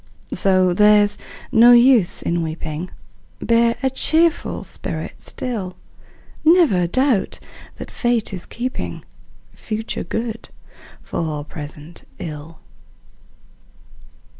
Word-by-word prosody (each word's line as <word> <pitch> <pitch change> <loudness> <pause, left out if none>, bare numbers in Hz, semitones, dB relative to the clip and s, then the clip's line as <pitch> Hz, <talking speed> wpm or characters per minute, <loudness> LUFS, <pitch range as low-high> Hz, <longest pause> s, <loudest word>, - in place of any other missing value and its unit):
So 185 -2 +2
there's 210 +1 +4 0.3
no 240 +2 +7
use 240 -6 +4
in 170 0 0
weeping, 160 +1 -5 0.5
Bear 235 0 +2
a 265 - +3
cheerful 320 +5 +2
spirit - - -5
still; 205 -8 -4 0.7
Never 310 - +4
doubt 255 +2 0 0.4
that - - -9
Fate 240 -4 -1
is 185 - -7
keeping 230 - -5 0.5
Future 220 +1 -5
good 225 0 -5 0.5
for 155 -3 -3
present 150 +2 -10
ill! 155 0 -8
205 Hz, 90 wpm, -20 LUFS, 170-240 Hz, 0.7 s, no